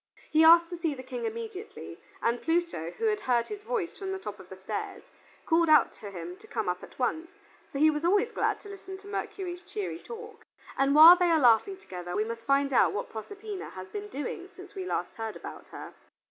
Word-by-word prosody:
He 315 +1 +5
asked 335 +1 +7
to 350 - -4
see 325 -4 -1
the 260 - -9
King 465 - -5
immediately, 445 -2 -6 0.2
and 235 +1 +1
Pluto, 330 - 0
who - - -1
had 430 -1 +2
heard 240 -2 +1
his 420 -1 -6
voice 430 -6 -3
from 385 -1 -4
the 385 - -2
top 210 - -7
of 190 -1 -13
the 190 - -8
stairs, 390 - -6 0.3
called 330 0 +3
out 305 - +6
to 205 - -9
him 175 -1 -7
to - - -16
come - - -3
up 180 0 -1
at - - -13
once, 320 +6 -1 0.4
for - - -4
he 310 +2 +5
was 300 +1 -3
always 405 +7 +3
glad - - 0
to - - -12
listen 385 -1 -8
to 395 +1 -15
Mercury's 365 -3 -4
cheery 405 +1 -5
talk. 450 -2 -10 0.3
And 275 +1 +2
while 325 +3 +11
they 360 -1 +2
are 330 - +5
laughing 250 - +4
together 180 - -7
we 210 - +2
must 230 0 -6
find 275 0 +2
out - - +4
what 205 - -4
Proserpina 405 - -7
had 185 0 -9
been 415 0 -5
doing 350 +1 -5
since 380 +1 -13
we 380 -2 -5
last - - -3
heard 225 -1 -4
about - - -9
her. - - -9
335 Hz, 225 wpm, -29 LUFS, 245-400 Hz, 0.4 s, while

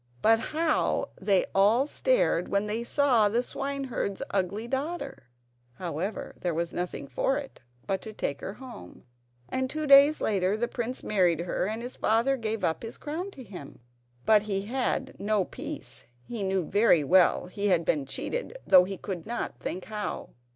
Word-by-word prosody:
But 225 0 +6
how 310 +5 0
they 195 -3 +3
all 210 +7 +4
stared - - +1
when 200 +1 +1
they 215 +3 -2
saw 240 -5 +3
the 235 +4 +1
swineherd's 270 -8 -3
ugly 200 +4 -1
daughter! 275 - -4 0.5
However, 180 - -4
there 175 -3 -1
was 170 +1 -2
nothing 175 -5 -4
for 270 - 0
it 285 -2 -7 0.3
but 190 -1 -1
to 220 - -8
take 140 -9 -3
her 195 - -5
home; 250 - -11 0.4
and, 260 0 -1
two 310 +2 -3
days 280 +2 +7
later, 195 -1 +1
the 240 +2 0
prince 240 +2 -4
married 180 -5 +2
her, 180 +1 -1
and 220 +2 -4
his 245 - -7
father 230 +5 +2
gave 225 -3 -3
up 160 - +1
the 225 - -6
crown 325 +6 -5
to 275 -9 -11
him. 185 - -10 0.5
But 215 -1 +6
he 200 -2 -1
had 260 +3 -2
no 205 -2 +1
peace! - - -7 0.2
He 230 - -5
knew 190 -2 0
very 200 -4 +4
well 180 +5 +4
he 200 +3 -2
had 175 -4 +3
been 145 -5 0
cheated, - - -4
though 180 -1 +7
he 195 0 -5
could 185 -1 -6
not 240 +1 -4
think 185 - -4
how. 210 -1 -4
215 Hz, 170 wpm, -28 LUFS, 190-260 Hz, 0.5 s, days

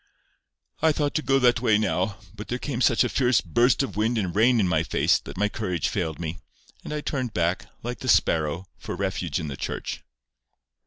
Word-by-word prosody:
"I 160 0 +5
thought 145 -1 -1
to 155 - 0
go 135 -2 +2
that 125 -2 +3
way 110 -4 +4
now, 95 -1 0 0.2
but 105 0 -8
there 125 - -2
came 130 -2 -4
such 115 -6 +4
a - - +1
fierce 125 -4 +2
burst 120 - +2
of 135 - -5
wind 110 +3 +1
and 95 -5 -2
rain 115 +3 +4
in 95 - +2
my 80 -2 +2
face, 85 - +2
that - - -10
my 105 +2 +2
courage 90 -6 -2
failed 85 -7 -2
me, 85 0 -5 0.4
and - - -7
I 150 0 -2
turned 130 -7 -3
back—like 90 +7 -2
the 130 - -6
sparrow—for 85 -3 0
refuge 90 -4 -2
in 80 - -4
the 70 - -5
church." - - -5
105 Hz, 200 wpm, -25 LUFS, 90-125 Hz, 0.4 s, I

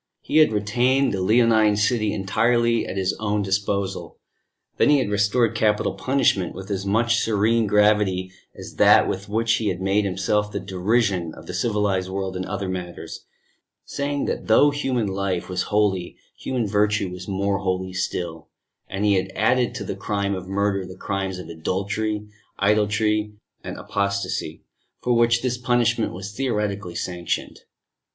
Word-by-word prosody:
He - - -1
had 155 -6 +6
retained 120 +5 +1
the 95 - -2
Leonine 110 +1 +4
City 105 0 +1
entirely 115 +4 +1
at - - -5
his 95 -1 0
own 105 -1 0
disposal. 100 0 -2 0.6
Then - - +4
he 145 - +6
had 125 -7 -1
restored 105 +3 +2
Capital 105 -1 +1
Punishment, 100 -4 +1
with 95 +2 -8
as 100 0 -2
much 115 +3 +2
serene 110 +1 +2
gravity 105 -3 +2 0.3
as - - -10
that - - +6
with - - -4
which 115 +2 +1
he 110 - -2
had 90 -3 -1
made 95 +2 +1
himself 100 +2 0
the 100 - -3
derision 95 -2 0
of - - -12
the - - -7
civilised 105 -4 0
world 95 0 -3
in 95 0 -3
other 100 0 -4
matters, 90 -2 -6 0.6
saying 140 0 -2
that - - -3
though 145 +6 +5
human 130 -5 -1
life 95 -2 -2
was 90 0 -1
holy, 100 -4 0 0.2
human 125 -3 -2
virtue 105 -1 +1
was 90 0 -8
more 100 0 0
holy 95 -1 -2
still; 85 -4 -3 0.4
and 100 +2 -2
he 105 - +4
had 95 0 0
added 125 -1 +2
to - - -4
the - - -4
crime 100 0 -2
of 95 -1 -5
murder, 100 0 0
the 95 0 -10
crimes 95 -1 -3
of 90 - -8
adultery, 100 +6 -2 0.3
idolatry 105 +1 +1 0.3
and - - -6
apostasy, 100 -5 -2 0.4
for 125 - 0
which 115 0 +3
this 125 -1 -1
punishment 120 -2 +1
was 95 +3 -7
theoretically 105 -7 -2
sanctioned. 90 -1 -3
100 Hz, 160 wpm, -23 LUFS, 95-110 Hz, 0.6 s, had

